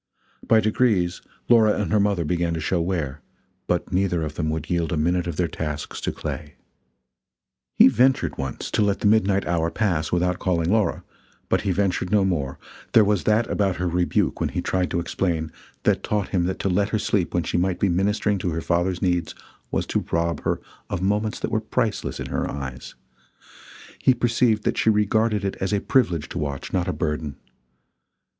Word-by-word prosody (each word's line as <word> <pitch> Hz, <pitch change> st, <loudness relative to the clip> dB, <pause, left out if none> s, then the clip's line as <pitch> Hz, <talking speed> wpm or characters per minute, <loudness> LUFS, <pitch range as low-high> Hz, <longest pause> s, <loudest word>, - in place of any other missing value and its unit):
By 110 Hz, -1 st, +5 dB
degrees 105 Hz, -5 st, +1 dB, 0.3 s
Laura 110 Hz, -3 st, +5 dB
and 105 Hz, -, -2 dB
her 105 Hz, -, +4 dB
mother 100 Hz, -5 st, +1 dB
began 85 Hz, 0 st, 0 dB
to -, -, -3 dB
show 85 Hz, +2 st, 0 dB
wear, 80 Hz, -5 st, -2 dB, 0.5 s
but -, -, -1 dB
neither 90 Hz, -3 st, +1 dB
of 75 Hz, -1 st, -4 dB
them 80 Hz, 0 st, -2 dB
would 80 Hz, 0 st, -3 dB
yield 85 Hz, -1 st, -1 dB
a 85 Hz, -, 0 dB
minute 85 Hz, +3 st, +1 dB
of 85 Hz, -, -3 dB
their 85 Hz, +1 st, +1 dB
tasks 75 Hz, -2 st, -5 dB
to -, -, -1 dB
Clay. 75 Hz, -1 st, -6 dB, 1.2 s
He -, -, +8 dB
ventured 130 Hz, +2 st, +3 dB
once 65 Hz, 0 st, -4 dB
to -, -, +1 dB
let 100 Hz, -1 st, +1 dB
the -, -, -2 dB
midnight 100 Hz, -2 st, +3 dB
hour 85 Hz, -1 st, 0 dB
pass 85 Hz, -7 st, -1 dB
without 90 Hz, 0 st, +1 dB
calling 85 Hz, -2 st, 0 dB
Laura, 110 Hz, -1 st, +1 dB, 0.5 s
but -, -, +2 dB
he 100 Hz, -, 0 dB
ventured 95 Hz, -1 st, 0 dB
no 105 Hz, -2 st, +4 dB
more; 75 Hz, -8 st, -1 dB, 0.4 s
there 110 Hz, -, +7 dB
was 105 Hz, -2 st, +1 dB
that 110 Hz, +2 st, +3 dB
about 95 Hz, -3 st, 0 dB
her 90 Hz, 0 st, -2 dB
rebuke 90 Hz, 0 st, 0 dB
when -, -, 0 dB
he -, -, -3 dB
tried 90 Hz, -1 st, 0 dB
to 85 Hz, -, -1 dB
explain, 85 Hz, -2 st, -2 dB, 0.3 s
that -, -, +2 dB
taught 105 Hz, -2 st, -1 dB
him 90 Hz, -2 st, +1 dB
that 95 Hz, -, -2 dB
to -, -, -2 dB
let 100 Hz, +2 st, +1 dB
her 110 Hz, -, 0 dB
sleep 100 Hz, -4 st, 0 dB
when 85 Hz, -, +2 dB
she -, -, -1 dB
might 90 Hz, +1 st, 0 dB
be 100 Hz, -, +2 dB
ministering 100 Hz, +3 st, +1 dB
to 90 Hz, -, -1 dB
her 80 Hz, 0 st, -2 dB
father's 90 Hz, +3 st, 0 dB
needs, 90 Hz, -3 st, 0 dB, 0.3 s
was -, -, -1 dB
to -, -, -1 dB
rob 85 Hz, 0 st, 0 dB
her -, -, -1 dB, 0.3 s
of 90 Hz, -, -3 dB
moments 105 Hz, +2 st, 0 dB
that -, -, -3 dB
were 110 Hz, -, +1 dB
priceless 110 Hz, -1 st, -2 dB
in -, -, -4 dB
her -, -, -2 dB
eyes; 65 Hz, -3 st, -6 dB, 1.0 s
he 130 Hz, -, +4 dB
perceived 120 Hz, -2 st, +2 dB
that -, -, 0 dB
she -, -, +3 dB
regarded 105 Hz, 0 st, +2 dB
it 95 Hz, -, -2 dB
as 95 Hz, -, -2 dB
a 100 Hz, -, +2 dB
privilege 95 Hz, -, +1 dB
to -, -, -5 dB
watch, 70 Hz, -2 st, -4 dB
not 90 Hz, -2 st, 0 dB
a -, -, +1 dB
burden. 75 Hz, -3 st, -3 dB
90 Hz, 200 wpm, -23 LUFS, 85-105 Hz, 1.2 s, He